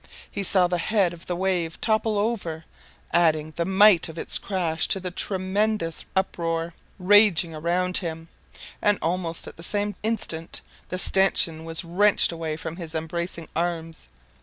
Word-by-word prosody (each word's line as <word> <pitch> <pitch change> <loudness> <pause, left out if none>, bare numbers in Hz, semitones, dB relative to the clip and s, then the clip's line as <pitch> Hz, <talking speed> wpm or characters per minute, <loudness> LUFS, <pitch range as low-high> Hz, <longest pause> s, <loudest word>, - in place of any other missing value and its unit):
He - - -3
saw 190 -1 +4
the 175 0 -1
head 190 -1 +1
of 170 0 -13
the 175 - -2
wave 180 -3 -1
topple 220 -1 0
over, 195 -7 -2 0.5
adding 155 -2 +2
the 170 - -1
mite 190 -2 +5
of 160 - -10
its - - +2
crash 175 -5 -1
to 195 - +1
the 180 -1 -5
tremendous 190 -1 -1
uproar 170 -3 -1 0.2
raging 190 -3 +4
around 175 +3 0
him, 165 -2 -6 0.5
and 205 -1 +3
almost 170 0 -2
at - - -11
the - - -11
same 205 +3 -1
instant 200 -7 -2 0.3
the 185 - -3
stanchion 175 -4 +3
was 165 +2 0
wrenched 195 +4 +3
away 165 -2 -4
from 165 +1 -6
his 165 -3 -6
embracing 165 +1 -4
arms. 165 - -3
175 Hz, 155 wpm, -24 LUFS, 165-195 Hz, 0.5 s, mite